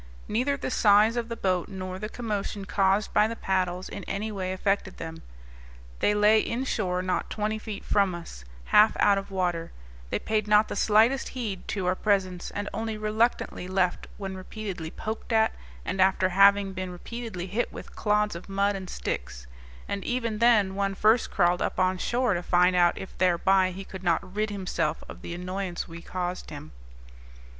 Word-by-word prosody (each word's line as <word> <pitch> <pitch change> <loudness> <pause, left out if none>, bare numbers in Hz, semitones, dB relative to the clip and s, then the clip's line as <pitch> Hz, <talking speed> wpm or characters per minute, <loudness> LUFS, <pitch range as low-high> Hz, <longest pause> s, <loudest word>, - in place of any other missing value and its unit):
Neither 255 +6 0
the 260 - -4
size 210 +1 +5
of 235 -1 -2
the 230 - -3
boat 185 -5 0
nor 185 -2 -6
the 215 - -4
commotion 210 -3 -4
caused 195 +1 +1
by 210 - +5
the 230 - -4
paddles 185 -3 -1
in 200 - -7
any 210 +3 -3
way 190 -2 -3
affected 195 +1 -1
them. 165 0 -7 0.8
They 210 - +2
lay 210 +1 +5
inshore, 215 -7 -1
not 185 0 -1
twenty 215 +1 -2
feet 215 -2 -7
from 200 -3 +2
us, 165 - -9 0.3
half 210 +1 +6
out 200 -1 +5
of 195 - -9
water; 175 -3 -1 0.4
they - - 0
paid 215 -1 -1
not 210 +1 +5
the - - -3
slightest 225 +6 +3
heed 205 -7 -4
to 195 -3 -2
our 180 - +3
presence, 185 -3 0
and 205 0 -4
only 220 -1 -3
reluctantly 215 -3 0
left 185 -1 0
when 195 -2 -5
repeatedly 185 -3 -6
poked 220 +7 -6
at, 220 -1 +3 0.3
and 190 - -1
after 190 0 +3
having 200 +1 +5
been 185 0 -4
repeatedly 185 +1 -6
hit 210 +6 -2
with - - -10
clods 210 -2 +1
of 170 - -9
mud 200 +1 +1
and 190 -2 -6
sticks; - - -4 0.4
and 200 -1 -3
even 230 -3 -2
then 220 -5 +4
one 195 0 -1
first 220 +4 +3
crawled 175 -1 +2
up - - -1
on 185 0 +2
shore, 245 +1 +1
to 175 - -1
find 180 +1 +3
out 175 -1 +4
if 190 - -8
thereby 185 +1 +3
he 185 +2 -7
could 190 -1 -9
not 175 +2 0
rid 215 +1 0
himself 185 -6 -2
of - - -10
the 170 - -6
annoyance 180 0 -4
we 170 0 -9
caused 180 +1 -4
him. 150 +1 -9
195 Hz, 185 wpm, -27 LUFS, 185-215 Hz, 0.8 s, half